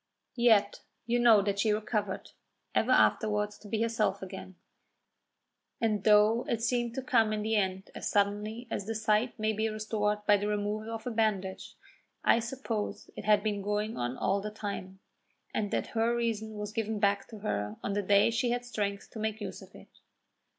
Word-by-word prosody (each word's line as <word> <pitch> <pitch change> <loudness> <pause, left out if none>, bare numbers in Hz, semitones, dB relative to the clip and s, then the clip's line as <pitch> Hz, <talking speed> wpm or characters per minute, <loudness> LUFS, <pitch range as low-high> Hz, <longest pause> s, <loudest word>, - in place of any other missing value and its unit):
Yet 230 -4 +4 0.2
you 240 +1 +1
know 225 -4 +6
that 200 0 -1
she 215 +1 +3
recovered, 210 -2 -2 0.4
ever - - +1
afterwards 210 -1 +2
to 210 - -13
be 220 +1 0
herself 215 -4 0
again; 190 0 -8 1.2
and 215 -3 0
though 215 +2 +5
it 230 -1 -1
seemed 240 0 0
to 265 - -3
come 225 -4 +3
in 210 -1 -1
the 220 +1 0
end 190 -1 -1
as - - -4
suddenly 210 +4 0
as 200 - -3
the 225 - -2
sight 220 +3 +1
may 215 0 0
be 220 +1 0
restored 210 -1 -1
by 205 0 +6
the 205 +1 -2
removal 210 +1 -2
of 225 +1 -6
a 250 - -2
bandage, 205 -4 -1 0.5
I 230 - +5
suppose 235 -3 -4
it - - -7
had 210 -1 +4
been 210 -2 -1
going 210 +2 -1
on 120 +1 -3
all 195 +1 +1
the 210 - -4
time, 200 -3 -6 0.5
and 205 -2 -1
that - - -1
her 230 +1 +2
reason 220 -2 -2
was 210 0 -4
given 220 -1 -2
back 200 -1 +1
to 220 - -10
her 105 - -2
on 200 - -1
the 205 - +1
day 200 +3 +4
she 240 +2 0
had 245 0 -1
strength 205 -4 -3
to 220 - -8
make 220 0 -2
use - - -6
of - - -15
it. - - -16
215 Hz, 190 wpm, -30 LUFS, 205-225 Hz, 1.2 s, know